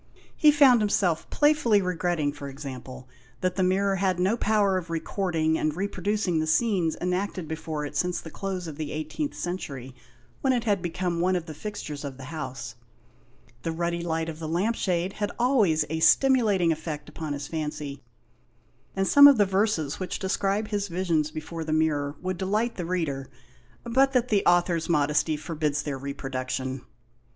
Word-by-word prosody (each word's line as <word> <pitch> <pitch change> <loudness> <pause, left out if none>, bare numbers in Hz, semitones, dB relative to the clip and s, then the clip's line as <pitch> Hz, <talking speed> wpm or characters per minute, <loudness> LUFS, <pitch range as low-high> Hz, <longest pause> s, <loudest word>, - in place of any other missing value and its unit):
He 305 - +5
found 275 -5 +6
himself 190 -5 +1
playfully 295 -8 +3
re 180 -2 -1
gretting, 165 -4 0
for 145 -1 -7
example, 130 -2 -8 0.3
that 185 0 0
the 190 - 0
mirror 195 +1 +2
had 185 -1 0
no 190 +5 +2
power 210 -4 +2
of 180 -2 -3
recording 165 -1 0
and 155 -1 0
reproducing 195 -1 -1
the 155 - -1
scenes 175 -2 +1
enacted 180 -1 -2
before 155 -1 -4
it 145 - -7
since 180 +4 0
the 160 - -10
close 190 -2 -4
of 155 -3 -7
the 155 -2 -4
18th 155 - -4
century, 140 -8 -5 0.5
when 265 -1 +3
it 240 -2 0
had 205 -5 +1
become 175 0 -2
one 185 +1 +2
of 175 -2 -2
the 160 - -7
fixtures 150 -5 -6
of 140 -2 -6
the 135 - -10
house. 130 -7 -5 0.9
The 165 - -2
ruddy 170 +1 -2
light 165 -1 -1
of 160 -1 -6
the 160 - -5
lamp 185 +8 0
shade 180 -1 -1
had 205 -1 -2
always 215 - +3
a 160 +2 -3
stimulating 210 -5 +4
effect 155 -2 -4
upon 150 -1 -5
his 140 -1 -5
fancy, 150 -3 -4 0.9
and 195 0 0
some 285 0 +9
of 280 -3 +7
the 205 - +5
verses 190 -7 0
which 185 - -3
describe 200 +2 -1
his 205 -1 -1
visions 170 -4 0
before 160 +2 -6
the 155 0 -2
mirror 150 -2 +1
would 185 -1 -3
delight 215 +5 0
the 180 - -5
reader, 150 -7 -2 0.5
but 265 +3 +3
that 250 -1 +2
the 205 -2 +2
author's 175 -1 +2
modesty 150 0 +2
forbids 150 -2 -2
their 140 -3 -4
reproduction. 130 -1 -4
175 Hz, 175 wpm, -26 LUFS, 155-200 Hz, 0.9 s, some